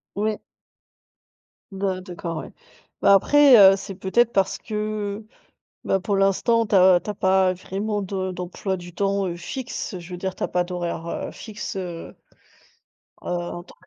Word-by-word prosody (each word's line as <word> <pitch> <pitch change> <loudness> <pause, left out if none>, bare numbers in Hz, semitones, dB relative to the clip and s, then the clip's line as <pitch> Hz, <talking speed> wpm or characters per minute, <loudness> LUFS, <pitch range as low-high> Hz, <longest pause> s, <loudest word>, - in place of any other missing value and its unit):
Ouais. 215 +1 -1 1.3
Ben, 190 -1 -2
d'accord 170 -2 -6
ouais. - - -7 0.5
Ben, - - +6
après, 275 +5 +6
heu, 195 -1 +9
c'est 195 0 -7
peut-être 230 +6 +2
parce 195 -1 +1
que, 210 -1 -4 0.6
ben, 195 - +1
pour 200 +1 -1
l'instant 210 +4 +2
tu 205 - +1
as 185 -1 +6
tu - - -6
as - - -1
pas 190 -1 +3
vraiment 205 +3 -3
de 190 -1 -3
d'emploi 180 +2 -4
du 175 -1 -11
temps, 200 +1 0
heu, 170 - -4
fixe, 235 - -5
je 175 0 -11
veux 180 - -5
dire 190 +1 -4
tu - - -5
as - - +1
pas 180 - 0
d'horaires 175 -2 -4
heu, - - -4
fixes, 215 -3 -7
heu, 175 -3 -5
heu, - - -17 1.1
en 175 0 -4
tant 175 - -17
190 Hz, 170 wpm, -23 LUFS, 180-205 Hz, 1.3 s, heu